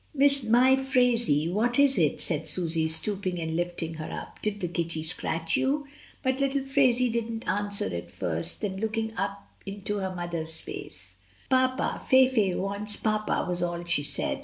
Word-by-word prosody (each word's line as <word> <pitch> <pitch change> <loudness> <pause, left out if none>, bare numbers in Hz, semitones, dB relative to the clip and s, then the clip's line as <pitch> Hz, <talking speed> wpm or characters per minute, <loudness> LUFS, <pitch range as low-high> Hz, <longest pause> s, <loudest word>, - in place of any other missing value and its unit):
"My 265 -2 +4
Phraisie, 245 - +2
what 240 +4 +1
is 280 -4 +4
it?" 155 -4 +2
said 160 -2 0
Susy, 165 -3 +3
stooping 185 +3 +1
and 160 -1 -3
lifting 175 -1 -2
her - - -6
up. - - -8
"Did 210 -1 0
the 180 - -2
kitty 165 -2 -2
scratch 165 0 -1
you?" 285 +2 0 0.4
but 260 0 0
little 275 0 0
Phraisie 255 -3 +3
didn't 230 0 -3
answer 205 0 -1
at 85 - -5
first, 85 -1 -3
then 195 -3 -3
look 220 +2 -2
ing 220 0 -2
up 200 -2 -4 0.2
into 200 +1 -4
her 190 -2 -3
mother's 165 -2 -4
face, 95 0 -8 0.3
"Papa, 260 0 +1
Fayfay 255 -8 +4
wants 200 +2 -3
papa," 215 -1 -1
was 180 -1 -1
all 175 0 -2
she 170 -4 +2
said. 145 -1 -2
200 Hz, 165 wpm, -27 LUFS, 170-245 Hz, 0.4 s, My